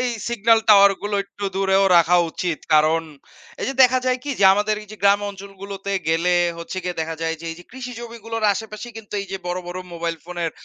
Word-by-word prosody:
এই 250 -1 0 0.2
signal 230 -1 +3
tower 200 -1 +8
গুলো 205 0 -2
একটু 200 0 -9
দূরেও 195 0 +3
রাখা 170 +1 +5
উচিত। 170 -2 -3 0.2
কারণ, 155 +2 +4 0.6
এই - - -2
যে 270 - -3
দেখা 255 0 +5
যায় 255 0 +1
কি 290 - -4
যে - - +5
আমাদের 210 +1 +1
এই 210 - -16
যে - - -9
গ্রাম 200 +1 +5
অঞ্চলগুলোতে 195 0 -8 0.2
গেলে, 170 +2 +2 0.2
হচ্ছে 170 +2 -7
গিয়ে 180 -2 -4
দেখা 160 0 -3
যায় 165 0 -1
যে, - - -10
এই - - -11
যে - - -15
কৃষি 250 0 -7
জমিগুলোর 230 -1 -6
আশেপাশে 215 +2 -6
কিন্তু 220 -2 -11
এই 195 - -6
যে - - -1
বড়, 175 +1 -2
বড় 180 +1 -5
মোবাইল 170 0 -3
ফোনের 175 -2 -3
200 Hz, 215 wpm, -21 LUFS, 175-220 Hz, 0.6 s, tower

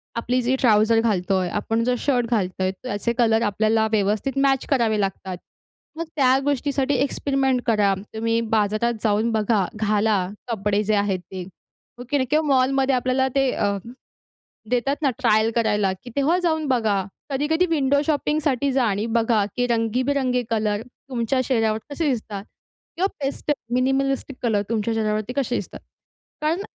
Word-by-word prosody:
आपली 245 +2 0
जी 250 +2 +1
ट्राउझर 225 -1 +4
घालतोय 190 -4 0
आपण, 225 +3 -1
जो 250 +1 +1
शर्ट 245 -2 +1
घालतोय, 190 -4 0
त्याचे 235 -1 -2
कलर 225 -2 +3
आपल्याला 220 +1 +2
व्यवस्थित 215 +5 0
मॅच 270 -1 +2
करावे 230 -6 +2
लागतात. 190 -2 -3 0.6
मग 335 - -3
त्या 265 -3 +4
गोष्टीसाठी 285 0 0
एक्सपेरिमेंट 270 -1 0
करा. 210 -3 +3 0.2
तुम्ही 230 +1 0 0.2
बाजारात 215 +3 +1
जाऊन 220 +1 +2
बघा, 215 -2 +1
घाला 210 -2 +1 0.2
कपडे 210 -1 0
जे 215 +1 +1
आहेत 200 -2 0
ते. 185 -1 -5 0.5
हो, 245 - -7
की 290 - +2
नाही. 260 -2 0
किंवा 310 +1 +3
मॉलमध्ये 265 +1 +2
आपल्याला 255 +1 +1
ते 270 -2 +3
अ, 200 0 0 0.9
देतात 250 +3 +1
ना 285 - +3
ट्रायल 220 +1 +3
करायला, 210 -4 +2
की 250 - -9
तेव्हा 290 +6 +2
जाऊन 315 -3 0
बघा. 220 -7 +1 0.3
कधी-कधी 295 +6 +1
विंडो 285 -3 +2
शॉपिंगसाठी 290 -3 0
जा 265 -1 +2
आणि 205 0 0
बघा, 225 -2 +2
की 245 - +1
रंगीबिरंगी 250 +2 0
कलर 215 -2 0 0.3
तुमच्या 250 +1 0
शरीरावर 225 -4 +1
कसे 300 +2 -2
दिसतात 215 -5 -3 0.5
किंवा 375 +3 +2 0.2
पेस्ट 280 +2 -2 0.2
मिनिमलिस्टिक 270 +2 0
कलर 220 -4 +2
तुमच्या 225 0 0
शरीरावरती 215 +1 -1
कसे 255 -3 0
दिसतात. 205 - -5 0.6
कारण 320 +5 0
235 Hz, 150 wpm, -23 LUFS, 215-270 Hz, 0.9 s, ट्राउझर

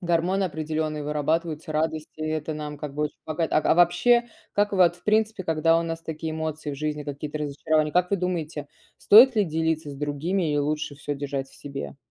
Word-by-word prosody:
гормоны 175 +3 +1
определённые 155 -2 -3
вырабатываются 155 +1 -1
радости, 155 0 -2
это 155 0 -2
нам 150 -1 -6
как 145 -2 -6
бы 150 +1 0
очень 150 - -5
помогает. 160 +1 -2
Ак 155 - +2
а - - +5
вообще, 175 +8 +4 0.3
как 205 0 +1
вот 180 -3 +4
в - - -26
принципе, 215 -2 +1
когда 165 +1 +3
у - - 0
нас 165 0 -4
такие 160 0 -5
эмоции 155 -1 -4
в - - -4
жизни, 150 0 -3
какие-то 145 +1 -5
разочарования, 150 +1 0
как 180 +1 +2
вы 200 - +2
думаете, 165 -5 -3 0.3
стоит 235 +3 +7
ли 210 - +4
делиться 160 -2 -1
с - - -8
другими, 150 +4 -1
и 145 - +1
лучше 150 0 -1
всё 145 0 -4
держать 140 -1 -4
в - - -19
себе? 140 0 -7
155 Hz, 200 wpm, -25 LUFS, 150-175 Hz, 0.3 s, стоит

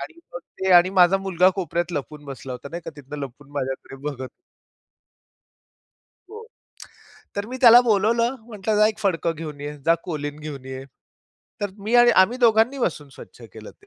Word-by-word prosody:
.आणि - - -8 0.2
मग - - -4 0.2
ते 190 0 0
आणि 175 +1 +6
माझा 185 0 +5
मुलगा 185 -1 +2
कोपऱ्यात 175 -1 -2
लपून 145 +1 -6
बसला 135 -1 -8
होता, 125 +3 -8
नाही 170 0 -6
का - - -6
तिथनं 145 +1 -9
लपून 140 +1 -9
माझ्याकडे 135 -1 -5
बघत. 130 -2 -8 2.0
हो. 440 +1 -9 0.9
तर 200 +1 -3
मी 255 +2 -6
त्याला 240 -1 +9
बोलावलं 230 +3 +1
म्हटलं 215 -1 -2
"जा 210 0 +5
एक 215 - -5
फडकं 170 -4 0
घेऊन 150 -2 -8
ये, 145 +1 -6
जा 165 - +5
कोलीन 150 -4 -5
घेऊन 145 -3 -8
ये". 130 0 -7 0.8
तर 205 -1 -2
मी 230 +3 -1
आणि 240 0 +6
आम्ही 235 +6 -1
दोघांनी 235 +2 +3
बसून 155 - -2
स्वच्छ - - -14
केलं - - -11
ते. 410 - -25
175 Hz, 175 wpm, -23 LUFS, 145-220 Hz, 2.0 s, त्याला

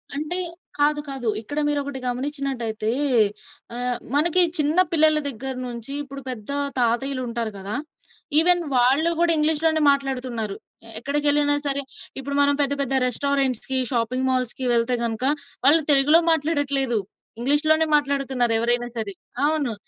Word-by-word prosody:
అంటే 305 +5 -2 0.4
కాదు. 295 +1 +2
కాదు. 265 -3 -4
ఇక్కడ 290 +7 -5
మీరొకటి 285 -2 -2
గమనించినట్లయితే 245 -4 -2 0.9
ఆహ్, 245 0 -1 0.2
మనకి 335 +5 +4 0.2
చిన్న 300 +2 +1
పిల్లల 310 -1 +4
దగ్గర 265 +1 -5
నుంచి 235 +2 -6
ఇప్పుడు 275 -1 -9
పెద్ద 235 -1 -7 0.3
తాతయ్యలుంటారు 240 -1 -1
గదా! 195 +2 -5 0.6
ఈవెన్ 350 +2 +4
వాళ్ళు 265 +7 +3
గూడా 345 0 +3
ఇంగ్లీష్‌లోనే 315 +1 +1
మాట్లాడుతున్నారు. 255 -6 -3 0.4
ఎక్కడికి 285 +4 -2
వెళ్ళినా 290 0 +3
సరే 280 0 0 0.4
ఇప్పుడు 280 +1 -5
మనం 285 0 +4
పెద్ద 285 0 +1
పెద్ద 270 -1 -2
రెస్టారెంట్స్‌కి, 265 0 0
షాపింగ్ 250 +2 -1
మాల్స్‌కి 255 0 -1
వెళ్తే 235 +1 +1
గనుక 230 +1 -2 0.4
వాళ్ళు 310 +4 +6
తెలుగులో 290 +4 +6
మాట్లాడట్లేదు. 285 -5 0 0.4
ఇంగ్లీష్‌లోనే 305 +5 +2
మాట్లాడుతున్నారు 275 -4 0
ఎవరైనా 240 +1 0
సరే. 210 -3 -3 0.3
అవును. 295 -5 0
275 Hz, 125 wpm, -23 LUFS, 245-295 Hz, 0.9 s, వాళ్ళు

